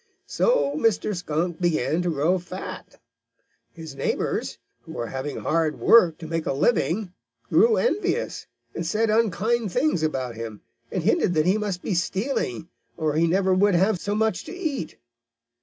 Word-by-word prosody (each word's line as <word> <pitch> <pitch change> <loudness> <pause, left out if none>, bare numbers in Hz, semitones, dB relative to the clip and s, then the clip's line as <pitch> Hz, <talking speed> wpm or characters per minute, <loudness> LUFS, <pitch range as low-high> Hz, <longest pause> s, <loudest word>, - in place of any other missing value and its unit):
"So - - +1
Mr. 225 -5 +1
Skunk 170 +1 -2
began 170 -1 +1
to 175 - -1
grow 165 +4 +1
fat. 180 +2 -8 0.7
His 160 -4 -9
neighbors, - - -2 0.2
who - - -11
were 120 - -3
having 135 +4 -5
hard 160 -1 0
work 175 -9 +5
to 160 - -8
make 165 0 -3
a - - +1
living, 180 - +1 0.4
grew 460 -1 +5
envious, 445 -3 -1 0.3
and 170 - -4
said 215 +6 +1
unkind 220 0 +1
things 250 - +1
about 130 -6 -1
him, 110 -2 -7 0.3
and - - -2
hinted 175 - +2
that 155 0 +3
he 190 +4 +3
must 200 -4 -3
be 205 - -1
stealing, 185 - -2 0.3
or 155 -1 0
he 165 +2 +2
never 190 +2 +2
could 200 0 +3
have 190 +2 +2
so 205 +3 -2
much 220 0 0
to - - -8
eat. 300 - -4
180 Hz, 160 wpm, -24 LUFS, 155-215 Hz, 0.7 s, work